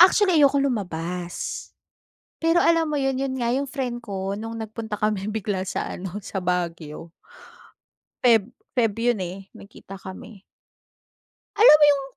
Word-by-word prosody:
Actually, 370 0 +6
ayokong 280 -1 +4
lumabas. 180 -5 -4 0.7
Pero 330 +1 +4
alam 330 -2 +3
mo - - +1
'yun, 270 -1 0
'yun 270 -1 -1
nga, 235 -1 0
yung 275 +2 0
friend 250 -3 -3
ko, 195 -1 -3
nung 225 +1 -6
nagpunta 220 -1 -5
kami 210 -2 0
bigla 200 -3 -2
sa - - -3
ano, 190 +2 -6
sa 195 - -6
Baguio. 170 -3 -3 1.1
Feb 230 -3 +5 0.3
Feb 225 -4 +3
yun, 240 -2 +2
eh, 190 +2 -9
nag-kita 195 -1 -12
kami. 190 +2 -10 1.1
Alam 420 -8 +9
mo 295 - +8
yung, 285 -1 +3
220 Hz, 145 wpm, -24 LUFS, 190-270 Hz, 1.1 s, Alam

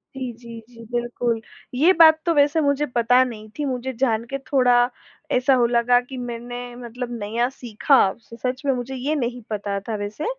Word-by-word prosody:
जी, 255 -2 -4
जी, 235 -1 -10
जी, 230 -1 -13
बिल्कुल, 240 -1 -1 0.3
ये 310 +9 +4
बात 315 -1 +8
तो 340 - +2
वैसे 295 +2 +3
मुझे 285 0 +1
पता 245 0 +3
नहीं 215 -4 -7
थी। 295 - 0
मुझे 260 -1 -3
जान 230 -4 +1
के 275 - -2
थोड़ा 245 -2 +4 0.4
ऐसा 255 +2 +3
हो 245 -2 +4
लगा 240 +1 +3
कि 255 +1 -10
मैंने 245 0 -6
मतलब 245 0 -7
नया 225 +4 -1
सीखा, 255 +1 0 0.2
स 230 0 -14
सच 255 +1 -1
में 275 - +3
मुझे 250 +2 -5
ये 280 +5 -1
नहीं 245 -3 -3
पता 200 -1 -3
था 220 - -2
वैसे। 205 +7 -5
245 Hz, 190 wpm, -22 LUFS, 235-265 Hz, 0.4 s, बात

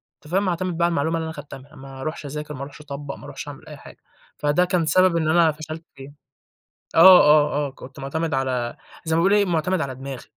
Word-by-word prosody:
أنت 150 - -17
فاهم؟ 195 +1 +1
واعتمد 180 -1 -2
بقى 170 - +2
على 175 - +1
المعلومة 160 +2 0
اللي 160 - -3
أنا 160 - -5
خدتها 145 -2 -9
منها، 145 +4 -18
ما 135 -1 -11
ارُوحش 155 0 -5
أذاكر، 150 +1 -6
ما 130 - -8
ارُوحش 140 +2 -9
أطبّق، 140 -1 -7
ما - - -13
اروحش - - -8
أعمل - - -10
أي - - -10
حاجة، - - -14 0.4
فده 150 +5 +2
كان 180 -3 0
سبب 185 +2 +3
إن 160 -1 0
أنا 165 -1 +4
فشلت 155 +2 -8
فيه. 135 +1 -12 0.8
آه، 180 +2 +9
آه، 150 -1 +3
آه - - -9
كنت 130 0 -13
مُعتمد 160 +3 -3
على 125 -3 -2 0.3
زي 160 0 0
ما 165 - +3
بيقول 195 +3 +3
إيه، 205 -1 +4
مُعتمد 175 0 0
على 130 -2 -4
دماغي، 135 -1 -8
155 Hz, 235 wpm, -22 LUFS, 140-170 Hz, 0.8 s, آه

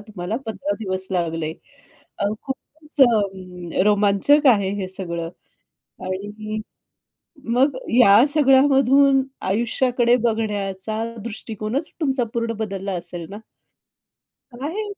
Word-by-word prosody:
तुम्हाला 210 -1 -5
15 285 +7 -3
दिवस 190 -2 -2
लागले. 165 -3 -2 0.7
अ, - - -1 0.2
खूपच 300 +3 -8
अ, 190 -7 0
रोमांचक 210 +8 +3
आहे 195 -2 -1
हे 185 - -4
सगळं 170 -3 -3 0.8
आणि 210 +3 -5 0.9
मग 255 +4 +2 0.2
या 210 +1 +7
सगळ्यामधून 275 -1 +4 0.3
आयुष्याकडे 240 +3 +1
बघण्याचा 215 -2 -1 0.2
दृष्टिकोनच 225 +4 -3
तुमचा 270 -5 +1
पूर्ण 230 0 -1
बदलला 195 -2 -4
असेल 175 -1 -4
ना? 205 - -7 1.2
आहे. 300 - -4
215 Hz, 95 wpm, -22 LUFS, 190-260 Hz, 1.2 s, या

